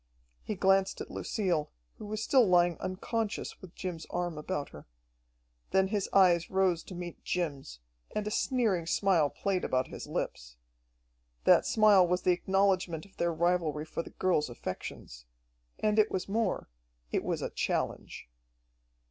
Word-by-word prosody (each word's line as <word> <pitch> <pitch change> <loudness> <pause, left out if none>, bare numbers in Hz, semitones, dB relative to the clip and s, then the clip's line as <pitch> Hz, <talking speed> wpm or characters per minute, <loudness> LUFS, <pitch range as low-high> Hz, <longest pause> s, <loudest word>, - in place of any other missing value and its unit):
He 215 - -4
glanced 195 0 +2
at - - -7
Lucille, 175 -8 -1 0.3
who 210 - -7
was 215 +1 -3
still 255 -3 +4
lying 175 -1 +4
unconscious 210 +4 -3
with 185 -3 -12
Jim's 175 -4 -5
arm 175 -1 -2
about 150 -1 -4
her. 75 - -13 0.8
Then 190 0 +2
his 205 -2 -1
eyes 175 -3 +4
rose 190 -3 +2
to 185 - -9
meet 175 -1 -7
Jim's, 145 - -3 0.4
and 210 - -1
a 210 - -2
sneering 215 -10 +1
smile 175 -5 +3
played 190 +2 -2
about 130 0 0
his - - -8
lips. - - -4 0.9
That - - +5
smile 205 -4 +5
was 180 +1 0
the 180 - +4
acknowledgment 185 -3 +1
of 195 - -21
their 170 - +1
rivalry 165 -2 0
for 160 - -4
the - - -10
girl's 175 -7 0
affections. - - -7 0.5
And 215 0 +1
it 215 - +5
was 185 - -3
more 220 +3 -1 0.4
it - - 0
was - - -2
a - - -3
challenge. - - -3
180 Hz, 155 wpm, -30 LUFS, 165-195 Hz, 0.9 s, That